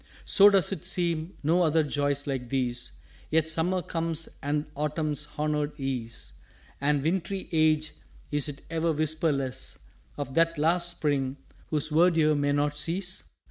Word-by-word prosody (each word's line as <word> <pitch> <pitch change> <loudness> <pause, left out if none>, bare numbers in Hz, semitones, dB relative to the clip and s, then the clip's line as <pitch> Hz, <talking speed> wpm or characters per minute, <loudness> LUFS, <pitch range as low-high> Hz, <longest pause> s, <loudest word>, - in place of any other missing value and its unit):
_" - - -28 0.2
"So 200 +1 +7
does 195 -4 +3
it 190 -6 -4
seem 175 -2 0
no 165 +5 +3
other 160 -1 +3
joys 145 -1 0
like 130 -3 -3
these! 125 -2 -2 0.4
Yet 160 0 +2
Summer 175 +3 0
comes, 165 -1 -2
and 145 +1 -1
Autumn's 150 0 -1
honoured 150 0 -1
ease; 125 -4 -4 0.5
And 145 -1 +2
wintry 190 +4 -1
Age, 155 -1 +2 0.4
is't 145 -1 -2
ever 165 0 +1
whisperless 145 - -1 0.4
Of 140 -2 -4
that 165 +1 +3
Last 170 +3 +3
Spring, 140 -5 -1 0.3
whose 155 -1 0
Verdure 160 -1 +4
may 145 0 +1
not 145 +1 0
cease?" 180 +3 -1
155 Hz, 140 wpm, -28 LUFS, 145-165 Hz, 0.5 s, So